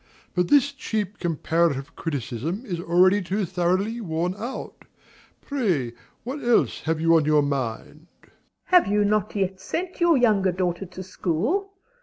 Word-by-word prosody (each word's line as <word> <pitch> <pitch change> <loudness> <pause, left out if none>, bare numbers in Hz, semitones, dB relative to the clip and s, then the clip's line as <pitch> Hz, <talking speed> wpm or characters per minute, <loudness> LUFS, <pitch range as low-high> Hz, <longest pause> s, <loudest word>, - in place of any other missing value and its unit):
But 180 -1 +1
this 285 +3 +4
cheap 215 -7 -4
comparative 160 -4 0
criticism 155 - -4
is 180 -7 -4
already 180 +4 +4
too 195 +2 -1
thoroughly 185 +6 0
worn 175 -1 -1
out. 235 +6 -7 0.6
Pray 180 - -1 0.3
what 270 +5 -5
else 240 -1 +2
have 160 0 0
you 165 +1 +4
on 155 - +1
your 150 -1 +4
mind? 140 +3 -4 0.2
MRS. - - -19
S. - - -27 0.3
Have 360 - +4
you 205 +1 +2
not 210 0 0
yet 190 -1 -1
sent 360 - -4
your 340 -3 +5
younger 210 -6 +3
daughter 180 +1 -2
to 185 +1 -8
school? 225 - -1
185 Hz, 155 wpm, -24 LUFS, 165-220 Hz, 0.6 s, your